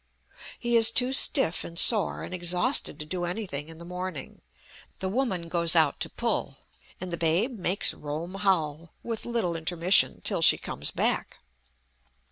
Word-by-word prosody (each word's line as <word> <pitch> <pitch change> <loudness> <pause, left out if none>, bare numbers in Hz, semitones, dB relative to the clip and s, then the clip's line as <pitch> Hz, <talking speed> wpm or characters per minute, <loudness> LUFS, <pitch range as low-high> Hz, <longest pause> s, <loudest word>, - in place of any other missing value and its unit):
He 240 0 -2
is 225 -1 +5
too 250 +3 +2
stiff 175 - +5
and 170 - -10
sore 215 +3 +4
and - - -8
exhausted 180 +9 +1
to 150 - -7
do 175 +3 -5
anything 175 -5 -5
in 165 - -12
the 170 - -11
morning; 180 -4 -7 0.6
the 190 - -4
woman 195 -7 -2
goes 170 0 +2
out 155 -3 +3
to - - -1
pull, - - -3 0.4
and 185 0 -6
the - - -3
babe 180 +9 0
makes 185 +2 0
Rome 155 +5 -7
howl, 170 -5 -2
with 230 -2 -5
little 225 -8 -2
intermission, 170 +3 +1
till - - -1
she - - +6
comes - - -5
back. - - -1
180 Hz, 160 wpm, -26 LUFS, 165-210 Hz, 0.6 s, she